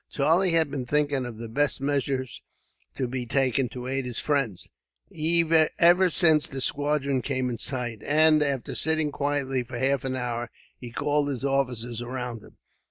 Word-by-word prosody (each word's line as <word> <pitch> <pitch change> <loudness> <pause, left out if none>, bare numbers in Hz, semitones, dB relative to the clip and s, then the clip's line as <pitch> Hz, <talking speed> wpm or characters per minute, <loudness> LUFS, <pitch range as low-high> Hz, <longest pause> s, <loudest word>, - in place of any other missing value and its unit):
Charlie 165 +5 +2
had 160 -3 +2
been 130 -3 -4
thinking 145 -2 0
of 115 -2 -8
the 115 +1 -6
best 145 +5 0
measures 135 -2 -2 0.5
to 130 - -2
be 125 0 -4
taken, 130 0 +1
to 125 +2 -7
aid 135 0 -2
his 120 - -6
friends, 135 - -1 1.1
ever 180 +2 +5
since 160 -3 +3
the 135 - -6
squadron 140 -1 0
came 130 -1 -2
in 115 - -5
sight; 125 -4 -3
and, 155 +1 +4
after 140 -4 -1
sitting 160 -1 0
quietly 140 -2 -1
for 120 0 -7
half 135 +1 +1
an 130 -1 -2
hour, 120 -2 -3 0.3
he 120 - -8
called 145 +4 0
his 135 -2 -3
officers 125 -4 -1
around 125 -2 -5
him. - - -18
135 Hz, 165 wpm, -26 LUFS, 125-145 Hz, 1.1 s, ever